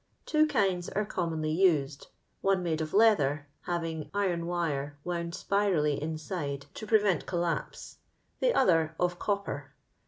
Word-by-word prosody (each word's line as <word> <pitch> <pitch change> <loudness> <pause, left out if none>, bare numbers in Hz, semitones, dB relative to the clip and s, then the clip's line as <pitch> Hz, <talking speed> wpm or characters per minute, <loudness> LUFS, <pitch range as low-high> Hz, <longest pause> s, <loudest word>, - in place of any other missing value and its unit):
Tie 310 0 +4
kinds 195 - +1
sre 210 +1 0
commonly 160 -5 -2
used; 155 -6 +2 0.4
onemadeof 170 -5 0
leelha; 155 -10 +4 0.2
having 165 -3 -3
iron 175 -4 0
wire 145 -5 -2
wound 170 -1 -3 0.2
roirally 170 -9 +2
inaide 155 -2 -4
to 215 - -7
iie 220 0 +5
ventedllspee, 175 -2 -1 0.4
the - - +3
other 165 -9 +3
of 175 0 0
copper. 150 -9 -3
170 Hz, 120 wpm, -29 LUFS, 155-195 Hz, 0.4 s, iie